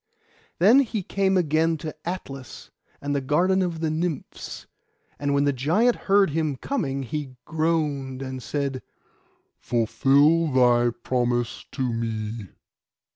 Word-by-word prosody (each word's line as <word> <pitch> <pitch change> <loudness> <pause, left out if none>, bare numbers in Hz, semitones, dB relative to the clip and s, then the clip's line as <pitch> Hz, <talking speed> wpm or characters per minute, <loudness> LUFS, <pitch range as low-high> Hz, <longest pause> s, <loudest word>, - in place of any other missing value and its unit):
Then 215 +10 +6
he 225 -7 -1
came 195 +1 +1
again 160 -1 +2
to 155 0 -6
Atlas, 135 -8 -7 0.3
and 145 0 -2
the 140 - 0
garden 175 +8 +2
of 170 -3 -2
the 160 -1 0
Nymphs; 160 -2 -4 0.5
and 145 0 -1
when 140 0 +2
the 145 0 +2
giant 175 - +2
heard 195 -3 +4
him 155 -2 0
coming 140 - -2
he 135 +1 -5
groaned, 150 -5 -1
and 130 -1 -6
said, 140 0 -3 0.8
'Fulfil 140 +7 +3
thy 120 -1 +4
promise 120 -2 -1
to 135 - -2
me. 110 -2 -4
145 Hz, 130 wpm, -25 LUFS, 130-165 Hz, 0.8 s, Then